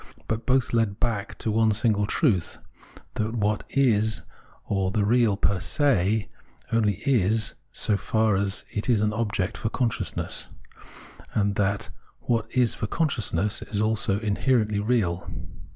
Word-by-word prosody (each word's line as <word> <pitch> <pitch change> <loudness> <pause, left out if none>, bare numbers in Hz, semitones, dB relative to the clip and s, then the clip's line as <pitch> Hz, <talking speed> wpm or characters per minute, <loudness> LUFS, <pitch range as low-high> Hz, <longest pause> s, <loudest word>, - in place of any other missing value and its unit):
But 110 +1 -3
both 130 -1 +2
lead 110 -3 +1
back 105 -4 -2
to 110 - -2
one 110 0 +3
single 105 -1 +1
truth, 105 - +1 0.6
that 110 +2 -2
what 105 -1 0
is 110 -5 +2 0.4
or 95 -2 0
the 105 +1 0
real 115 -2 +3
per 100 -2 +1
se 110 - +1 0.4
only 110 -3 +2
is 110 -4 +2 0.2
so 105 -4 +2
far 110 0 +1
as 100 0 -1
it 105 +4 -3
is 115 -4 +3
an 105 0 +1
object 105 -4 -2
for 110 - -2
consciousness, 120 -1 0 0.9
and 100 -1 +2
that 100 0 -1 0.3
what 115 -2 0
is 125 -2 +2
for 105 - -3
consciousness 105 - 0
is 105 - -4
also 110 -2 +1
inherently 110 0 +1
real. 105 -6 0
110 Hz, 140 wpm, -25 LUFS, 100-115 Hz, 0.9 s, one